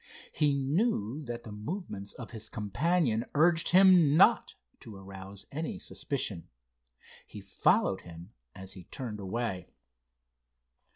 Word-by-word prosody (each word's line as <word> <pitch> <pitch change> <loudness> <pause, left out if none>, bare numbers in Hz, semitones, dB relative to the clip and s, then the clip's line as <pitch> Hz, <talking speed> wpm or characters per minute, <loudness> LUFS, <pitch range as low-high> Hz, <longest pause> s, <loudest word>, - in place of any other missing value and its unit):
He 145 -2 +2
knew 140 - 0
that 120 -1 -6
the 110 - -9
movements 105 - -6
of 120 - -9
his 110 -1 -7
companion 115 - 0
urged 165 +2 +4
him 180 -5 +6
not - - +4 0.2
to 110 - -11
arouse 95 0 -10
any 155 +3 -4
suspicion. 105 -11 -4 0.8
He - - -10
followed - - +1
him 85 +3 -12 0.2
as 95 0 -8
he 95 -3 -11
turned 115 -6 -6
away. 100 -1 -3
115 Hz, 120 wpm, -30 LUFS, 100-155 Hz, 0.8 s, him